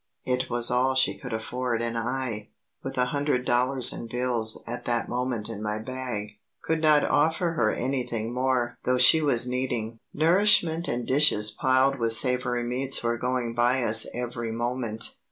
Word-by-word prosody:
It 125 0 -1
was 120 0 +2
all 130 +2 +1
she 130 - +2
could 125 - -9
afford 120 +2 -3
and 115 0 -3
I, 115 -2 -3 0.3
with 135 - -6
a 125 - +3
hundred 140 -3 -1
dollars 125 +1 +3
in 115 - -7
bills 120 -2 -1
at 120 +1 -6
that 120 -1 -1
moment 125 -3 -3
in 110 -2 -7
my 105 0 -2
bag, 110 -3 -6 0.2
could 160 -1 -1
not 155 -2 +4
offer 160 +3 +1
her 110 -10 +1
anything 120 -3 -3
more 125 -1 -1
though 125 0 +1
she 145 +5 +6
was 125 -5 +2
needing 120 -3 -3
nourishment 170 0 +2
and 120 0 -2
dishes 130 -7 +3
piled 130 +4 +1
with 115 -1 +1
savoury 125 0 +1
meats 130 +3 0
were 120 0 -1
going 125 -2 -2
by 120 +2 +1
us 110 -1 +4
every 120 -1 -5
moment. 115 -1 -3
125 Hz, 170 wpm, -26 LUFS, 115-130 Hz, 0.3 s, she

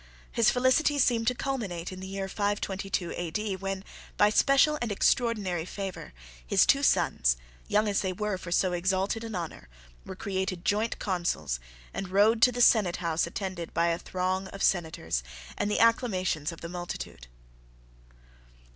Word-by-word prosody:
His 230 -2 +4
felicity 260 +4 +3
seemed 235 -4 +2
to 250 - +3
culminate 210 -11 -3
in 185 - -8
the 190 - -7
year 195 0 -4
522 195 -2 -2
A.D., 190 +4 -2
when, 195 0 -4 0.3
by 205 0 +5
special 275 +5 +4
and 240 -3 -1
extraordinary 205 -5 +1
favour, 195 +1 -6 0.3
his - - +4
two - - +4
sons, - - +2 0.3
young 210 +1 +2
as 200 -1 +1
they 190 - -1
were 205 0 -2
for 175 - -8
so 180 +1 +2
exalted 190 +5 0
an 225 -3 -5
honour, 170 - -6 0.3
were 190 - -8
created 190 -2 -3
joint 215 +3 +1
Consuls 170 - -2 0.3
and 195 - -4
rode 210 +4 +4
to 250 - +7
the 245 0 -2
senate 205 -8 +5
house 170 -1 0
attended 185 -1 -5
by 170 +1 +3
a 170 0 0
throng 185 +1 -2
of 195 0 -6
senators, 160 - 0 0.3
and 205 - -1
the 210 - 0
acclamations 190 - +2
of 165 - -11
the 170 - -5
multitude. 175 - -6
190 Hz, 160 wpm, -28 LUFS, 175-215 Hz, 0.3 s, to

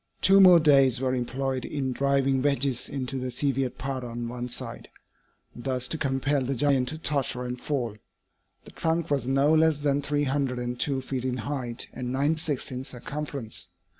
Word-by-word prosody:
Two 195 +1 +6
more 180 -2 +9
days 135 -5 +5
were 130 -1 0
employed 130 +1 -2
in 135 -3 -2
driving 135 0 +2
wedges 140 -3 +1
into 135 -1 -3
the 130 0 -3
severed 135 0 -1
part 135 -1 -4
on 120 0 -5
one 125 +1 -5
side, - - -6 0.7
thus 125 0 -2
to - - -1
compel 135 0 0
the 135 +2 -2
giant 135 -1 +2
to 155 - -2
totter 140 -5 -1
and 125 0 -5
fall. 125 -7 -2 0.7
The - - -12
trunk 165 -1 -1
was 140 -3 0
no 135 +3 +3
less 160 -1 +4
than 145 -1 +1
three 145 +1 0
hundred 135 -2 0
and 120 0 -4
two 135 -2 0
feet 130 -1 -4
in 130 -1 -1
height 120 -1 -3
and 125 -1 -4
ninety 145 +5 +1
six 145 -5 -2
in 130 0 -4
circumference. 135 -1 -6
135 Hz, 180 wpm, -27 LUFS, 125-145 Hz, 0.7 s, more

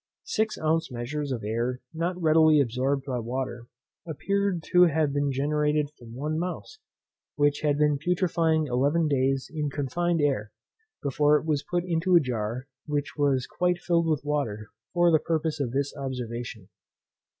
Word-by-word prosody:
Six 220 -1 0
ounce 160 0 0
measures 135 +4 -4
of 120 -4 -3
air 120 +4 -1
not 175 +3 -2
readily 155 -2 +5
absorbed 135 +2 0
by 130 -3 -2
water, 120 0 -4 0.4
appeared 190 +3 -1
to 180 0 +8
have 155 -3 +1
been 145 0 +1
generated 150 +2 0
from 120 -6 -13
one 150 +4 -2
mouse, 180 - -5 0.6
which 145 0 +2
had 145 -2 +1
been 150 -1 +2
putrefying 165 -3 +1
eleven 145 +5 +1
days 135 -1 0
in 150 -2 -1
confined 165 +5 -1
air, 135 -8 0 0.5
before 145 +2 +3
it - - -5
was 150 -3 +1
put 175 +2 -2
into 175 +1 +2
a - - +9
jar 120 -2 -3 0.2
which 145 -1 -2
was 140 -4 +1
quite 180 0 0
filled 170 -1 +1
with 155 -3 0
water, 115 -8 -2 0.2
for 175 0 +4
the 155 - +5
purpose 160 -1 -1
of 135 -4 -1
this 140 +3 -2
observation. 120 -6 -5
145 Hz, 160 wpm, -27 LUFS, 130-160 Hz, 0.6 s, a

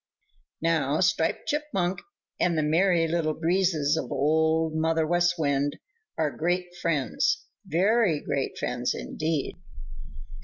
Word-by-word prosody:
Now 155 -3 +1
Striped 180 -3 +1
Chipmunk 240 -12 -1 0.4
and 170 -2 +2
the 155 - +2
Merry 165 +2 +3
Little 160 -2 0
Breezes 165 -3 +1
of 130 - -4
Old 160 +2 +2
Mother 160 0 +1
West 175 +2 +2
Wind 145 -2 0 0.4
are 155 -2 -1
great 175 +2 -1
friends, 170 - 0 0.2
very 190 -1 +2
great 140 -2 -3
friends, 125 0 -2
indeed. 155 -2 -3
160 Hz, 115 wpm, -26 LUFS, 155-175 Hz, 0.4 s, Merry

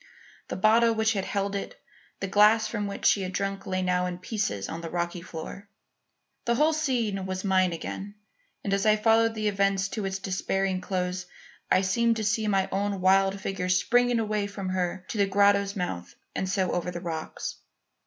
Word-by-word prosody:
The - - -4
bottle 225 +3 +4
which 220 0 +2
had 195 -2 -2
held 200 0 -2
it; 200 - -5 0.4
the 195 - -1
glass 210 +3 +5
from 210 -2 -3
which 200 0 -6
she 200 - +5
had 185 0 -4
drunk 195 0 -3
lay 185 0 -1
now 180 0 +1
in 180 -1 -4
pieces 180 - -2
on 165 - -5
the 165 - -5
rocky 175 0 -2
floor. 180 +3 -8 0.8
The 235 - +2
whole 305 +5 +3
scene 235 -11 -1
was 185 0 -3
mine 185 -2 +3
again 195 +4 -6 0.5
and 195 - -1
as 195 0 +1
I 215 - +6
followed 225 +1 +3
the 215 -1 -1
event 195 -1 +1
to 215 -3 -3
its 195 0 -2
despairing 190 0 -1
close, 185 -1 -2 0.4
I 185 - +4
seemed 230 +5 +2
to 220 - -2
see 215 +1 +1
my 195 -2 +2
own 200 0 -1
wild 195 +1 +3
figure 185 -2 -3
springing 245 +6 +3
away 210 -2 -1
from 200 -2 -5
her 180 0 -2
to 220 - -3
the 200 - +4
grotto's 200 0 +3
mouth 90 - -4 0.2
and 190 - -2
so 190 -2 0
over 175 0 -1
the 175 -1 -5
rocks. 165 -2 -5
195 Hz, 195 wpm, -27 LUFS, 185-210 Hz, 0.8 s, I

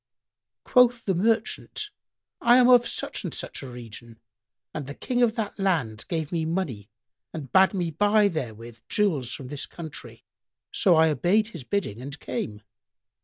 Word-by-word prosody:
Quoth 245 -2 +4
the 190 - +1
merchant, 225 - -1 0.5
"I 240 - +6
am 250 -1 +6
of 245 -1 +6
such - - -3
and - - -3
such - - -5
a 135 - -7
region, 115 -1 -10 0.5
and 145 -3 -5
the 140 - -7
King 245 -1 -1
of 230 -2 +3
that 215 -3 -4
land 150 - 0
gave 160 -3 -2
me 165 -2 0
money 160 - -3 0.4
and 150 -5 -7
bade 190 +1 +5
me 175 -3 -1
buy 205 +5 +4
therewith 115 - -5
jewels 155 - +1
from 130 -1 -6
this 145 -1 -4
country; 160 -3 -9 0.5
so 185 -5 +4
I 160 0 +5
obeyed 205 +8 +2
his 170 - -8
bidding 120 - -2
and 140 +3 -7
came." 105 -4 -5
165 Hz, 165 wpm, -26 LUFS, 130-210 Hz, 0.5 s, I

